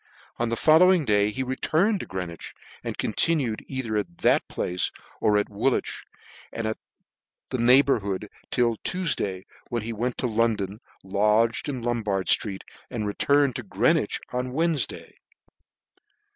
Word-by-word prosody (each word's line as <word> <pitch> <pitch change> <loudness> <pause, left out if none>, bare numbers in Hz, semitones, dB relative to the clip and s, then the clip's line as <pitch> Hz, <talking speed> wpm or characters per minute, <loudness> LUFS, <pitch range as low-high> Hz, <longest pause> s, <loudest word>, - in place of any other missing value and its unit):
On 120 -1 -1
the 115 - 0
follow 160 +8 +6
ing 175 -5 +2
day 105 -2 +3
he 130 +5 -3
returned 160 - +1
to - - -6
Greenwich, 90 -3 -6 0.3
and - - -5
continued 135 -10 +1
either 125 -5 -3
at 95 -5 -4
that - - +2
place 90 0 -1 0.3
or 105 -1 +3
at 105 - +1
Woolwich 115 +6 -1 0.5
and 110 -1 -2 0.8
the 130 - 0
neighbourhood 120 -6 +3 0.2
till 120 -2 +1
Tuefday, 105 - -1 0.3
when 120 -2 -2
he 115 +1 -4
went 120 +3 -2
to - - -2
London, 110 -3 0 0.2
lodged 105 +6 +2
in 130 -4 -4
Lombard 105 -5 -1
ftreet, 100 -3 +1 0.3
and 115 -4 -3
returned 140 +5 +2
to - - -4
Greenwich 105 - +1
on 125 +1 -1
the 125 - -7
Wednefday. 160 -6 -1
115 Hz, 145 wpm, -25 LUFS, 105-130 Hz, 0.8 s, follow